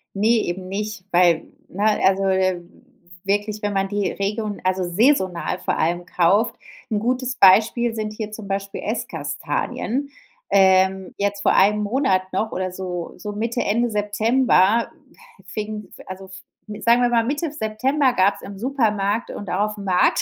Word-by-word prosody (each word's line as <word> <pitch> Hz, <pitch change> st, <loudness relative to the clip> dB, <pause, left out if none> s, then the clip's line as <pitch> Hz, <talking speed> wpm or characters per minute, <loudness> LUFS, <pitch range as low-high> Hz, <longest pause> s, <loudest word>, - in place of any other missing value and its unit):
Ne, 220 Hz, +3 st, +2 dB
eben 185 Hz, +1 st, -4 dB
nicht, 210 Hz, 0 st, -5 dB
weil, 175 Hz, -2 st, +4 dB, 0.2 s
ne, 200 Hz, +3 st, -4 dB, 0.2 s
also, 195 Hz, 0 st, +3 dB
äh, 185 Hz, -2 st, +1 dB, 0.6 s
wirklich, 205 Hz, +2 st, -1 dB
wenn 205 Hz, 0 st, -1 dB
man 195 Hz, 0 st, 0 dB
die 205 Hz, 0 st, -1 dB
Region 205 Hz, +1 st, -3 dB
also 185 Hz, 0 st, 0 dB
saisonal 185 Hz, -2 st, +1 dB
vor -, -, -2 dB
allem 175 Hz, +2 st, 0 dB
kauft 185 Hz, +6 st, +2 dB, 0.4 s
'N 210 Hz, -, +1 dB
gutes 255 Hz, +2 st, -1 dB
Beispiel 225 Hz, +4 st, +5 dB
sind 215 Hz, -1 st, -3 dB
hier 215 Hz, -1 st, -6 dB
zum 215 Hz, -2 st, -8 dB
Beispiel 195 Hz, 0 st, -4 dB
Esskastanien. 215 Hz, -, -3 dB, 0.4 s
Ähm, 190 Hz, -1 st, +3 dB
jetzt 200 Hz, 0 st, -1 dB
vor -, -, +3 dB
einem 210 Hz, +2 st, +4 dB
Monat 210 Hz, -4 st, +1 dB
noch 215 Hz, +3 st, -1 dB
oder 185 Hz, 0 st, -3 dB
so 180 Hz, -2 st, -5 dB
so 210 Hz, -, -6 dB
Mitte, 230 Hz, +3 st, -2 dB
Ende 235 Hz, +4 st, +1 dB
September, 220 Hz, +1 st, +2 dB, 0.6 s
fing, 210 Hz, 0 st, -5 dB, 0.2 s
also 190 Hz, +1 st, -8 dB
f 190 Hz, -, -14 dB, 0.5 s
sagen 235 Hz, +1 st, +4 dB
wir 245 Hz, -, +3 dB
mal 230 Hz, -1 st, +3 dB
Mitte 290 Hz, +6 st, -2 dB
September 260 Hz, +2 st, 0 dB
gab's 195 Hz, -2 st, +2 dB
im 200 Hz, -1 st, -9 dB
Supermarkt 225 Hz, -4 st, 0 dB
und 205 Hz, -, -7 dB
auch 205 Hz, +3 st, 0 dB
auf'm 200 Hz, -, -7 dB
Markt 180 Hz, -1 st, +3 dB
205 Hz, 155 wpm, -22 LUFS, 190-225 Hz, 0.6 s, Beispiel